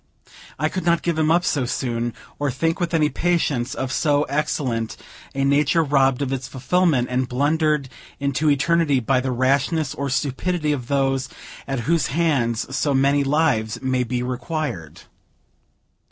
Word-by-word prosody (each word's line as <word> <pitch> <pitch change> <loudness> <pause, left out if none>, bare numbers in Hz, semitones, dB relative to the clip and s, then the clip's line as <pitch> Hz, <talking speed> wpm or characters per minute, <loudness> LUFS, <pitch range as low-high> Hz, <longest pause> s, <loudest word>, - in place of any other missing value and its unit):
I - - +1
could 185 - -4
not 170 0 +2
give 170 -2 0
him 155 0 +2
up 170 +2 +3
so 135 -4 +1
soon, 120 -2 -2 0.2
or 145 -1 0
think 165 +7 -1
with 175 -1 -1
any 155 -2 +3
patience 150 -9 0
of 130 0 -3
so 145 +2 +2
excellent 135 -6 -2 0.4
a 135 - 0
nature 145 +4 +3
robbed 135 -2 +2
of 135 -1 -2
its 130 -1 -4
fulfillment, 135 0 +1
and 125 0 -1
blundered 150 +2 +1 0.3
into 140 +2 +1
eternity 145 0 +2
by 130 +2 +1
the 130 - -2
rashness 135 +4 +1
or 140 0 -3
stupidity 150 +4 -1
of 130 -5 -3
those 135 -1 0 0.4
at 135 -3 -2
whose 160 +2 +1
hands 135 -6 0
so 140 0 +1
many 140 +1 +3
lives 135 -7 +1
may 130 -1 +1
be 125 0 -2
required. 125 - -4
140 Hz, 155 wpm, -22 LUFS, 130-155 Hz, 0.4 s, up